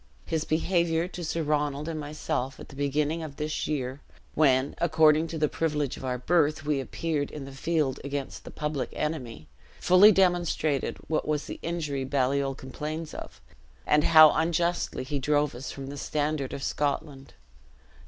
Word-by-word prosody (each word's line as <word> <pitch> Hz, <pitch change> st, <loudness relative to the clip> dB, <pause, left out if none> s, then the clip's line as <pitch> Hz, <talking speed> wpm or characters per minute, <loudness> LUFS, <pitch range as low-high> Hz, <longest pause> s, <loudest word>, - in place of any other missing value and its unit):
His 160 Hz, -1 st, -1 dB
behavior 170 Hz, 0 st, +1 dB
to 180 Hz, -1 st, -7 dB
Sir 165 Hz, 0 st, -2 dB
Ronald 150 Hz, 0 st, -1 dB
and 160 Hz, -2 st, -3 dB
myself 150 Hz, -2 st, -3 dB
at -, -, -11 dB
the -, -, -12 dB
beginning 145 Hz, +3 st, 0 dB
of 155 Hz, -3 st, -7 dB
this 150 Hz, +1 st, -3 dB
year, 135 Hz, -2 st, -3 dB, 0.3 s
when, 135 Hz, -2 st, +3 dB
according 160 Hz, -1 st, +4 dB
to 165 Hz, -, -5 dB
the 155 Hz, -1 st, +2 dB
privilege 150 Hz, -3 st, -1 dB
of -, -, -10 dB
our 125 Hz, -1 st, -1 dB
birth, 155 Hz, +2 st, +1 dB
we 150 Hz, -2 st, +1 dB
appeared 145 Hz, +1 st, -2 dB
in 145 Hz, -3 st, -7 dB
the 135 Hz, -, -9 dB
field 145 Hz, 0 st, -1 dB
against 140 Hz, -1 st, -5 dB
the -, -, -9 dB
public 150 Hz, -3 st, -3 dB
enemy, 125 Hz, -, -4 dB, 0.3 s
fully 185 Hz, +4 st, +7 dB
demonstrated 175 Hz, -6 st, +1 dB
what 155 Hz, -, -1 dB
was 150 Hz, -1 st, -1 dB
the -, -, -7 dB
injury 155 Hz, -5 st, -2 dB
Baliol 135 Hz, 0 st, 0 dB
complains 150 Hz, +4 st, -6 dB
of, -, -, -9 dB, 0.5 s
and 150 Hz, 0 st, +3 dB
how 155 Hz, -1 st, +9 dB
unjustly 170 Hz, -1 st, 0 dB
he 140 Hz, +2 st, -3 dB
drove 145 Hz, +1 st, +1 dB
us 125 Hz, +3 st, -7 dB
from 135 Hz, -, -7 dB
the 140 Hz, +1 st, -7 dB
standard 145 Hz, -1 st, -2 dB
of 135 Hz, -, -5 dB
Scotland. 140 Hz, -1 st, -3 dB
150 Hz, 165 wpm, -27 LUFS, 140-160 Hz, 0.5 s, how